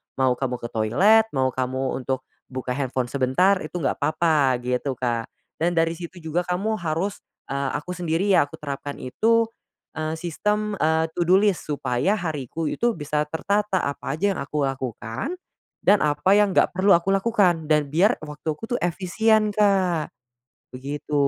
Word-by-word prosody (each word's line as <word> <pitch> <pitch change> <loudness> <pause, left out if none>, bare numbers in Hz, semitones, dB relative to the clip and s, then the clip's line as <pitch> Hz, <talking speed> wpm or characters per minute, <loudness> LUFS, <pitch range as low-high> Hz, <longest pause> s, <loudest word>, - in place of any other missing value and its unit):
Mau 130 -1 +2
kamu 130 -2 -1
ke - - -2
toilet, 195 - +4
mau 130 -1 +2
kamu 130 +1 -2
untuk 130 -1 -1 0.2
buka 130 -1 -5
handphone 130 -2 -2
sebentar, 140 +9 +3
itu 155 - -8
enggak - - 0
apa-apa, 155 -5 +2
gitu 125 +2 -1
Kak. 120 -2 -2 0.3
Dan 175 +2 +1
dari 165 0 +2
situ 175 +1 -9
juga 160 +2 -1
kamu 195 +5 0
harus, 170 +5 -2 0.3
eee, 140 -1 -2
aku 180 +4 -8
sendiri 175 +3 0
ya 180 - +6
aku - - -10
terapkan 145 -1 -5
itu, 225 - +2 0.5
eee, 155 +1 -2
sistem 210 +5 -1
eee, 160 +1 +2
to 175 - +1
do 185 - +6
list, 200 -6 +1
supaya 135 - 0
hariku 155 -1 -3
itu 240 +8 +1
bisa 150 -1 -1
tertata, 200 +4 0
apa 140 -1 -3
aja 200 +5 +1
yang - - -5
aku 145 +1 -2
lakukan. 130 - -4 0.5
Dan 205 - +5
apa 150 +5 +2
yang 205 -2 +4
enggak - - +4
perlu 195 +2 +3
aku 170 +3 -1
lakukan 195 -5 +2
dan 150 -2 +2
biar 185 - +3
waktu 150 +1 -9
aku 225 +10 -4
tuh - - -1
efisien 215 +5 +2
Kak. 190 -6 +2 0.6
Begitu. 145 +3 -5
160 Hz, 165 wpm, -24 LUFS, 135-195 Hz, 0.6 s, ya